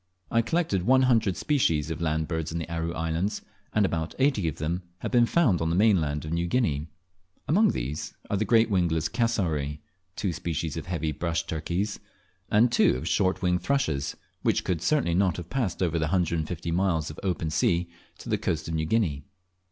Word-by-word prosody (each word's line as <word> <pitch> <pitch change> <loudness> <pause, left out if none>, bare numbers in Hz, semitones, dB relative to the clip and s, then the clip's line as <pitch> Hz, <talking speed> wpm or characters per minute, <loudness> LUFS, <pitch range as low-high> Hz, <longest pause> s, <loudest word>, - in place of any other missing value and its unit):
I 115 - +4
collected 135 - 0
one 130 +1 +5
hundred 115 -7 +2
species 80 - +1
of 80 +1 -4
land 80 -1 0
birds 80 -2 -3
in 85 - -3
the 85 - -4
Aru 85 0 -2
Islands, 80 +5 -2 0.3
and 105 -1 +3
about 80 -2 -2
eighty 130 - +2
of 75 - -2
them, 85 +4 -2 0.2
have - - -3
been 120 -2 +5
found 120 - +3
on 80 - 0
the 85 - +1
mainland 85 -8 +2
of 75 - -5
New 85 +1 0
Guinea. 80 - 0 0.6
Among 205 +8 +4
these 70 - -4
are - - -1
the 100 - +1
great 115 +1 +4
wingless 85 -4 +1
cassowary, 80 - -1 0.4
two 95 -4 -1
species 80 0 -3
of 80 0 -6
heavy 80 -3 -1
brush 85 +2 -2
turkeys, 85 +6 -2 0.5
and 115 +3 +4
two 120 - +4
of 80 - -5
short 95 +1 +1
winged 90 -1 +2
thrushes; 80 - 0 0.2
which - - +1
could 85 -4 -1
certainly 140 - +2
not 95 -1 +2
have 90 -1 -8
passed 120 -9 -1
over 85 -2 +1
the 80 - +1
150 85 -1 -1
miles 85 -3 +1
of 75 - -10
open 85 -4 -1
sea 85 +3 +1 0.3
to - - -11
the - - 0
coast 80 0 -2
of 80 - -3
New 80 -1 0
Guinea. 80 -8 +1
85 Hz, 195 wpm, -27 LUFS, 80-105 Hz, 0.6 s, one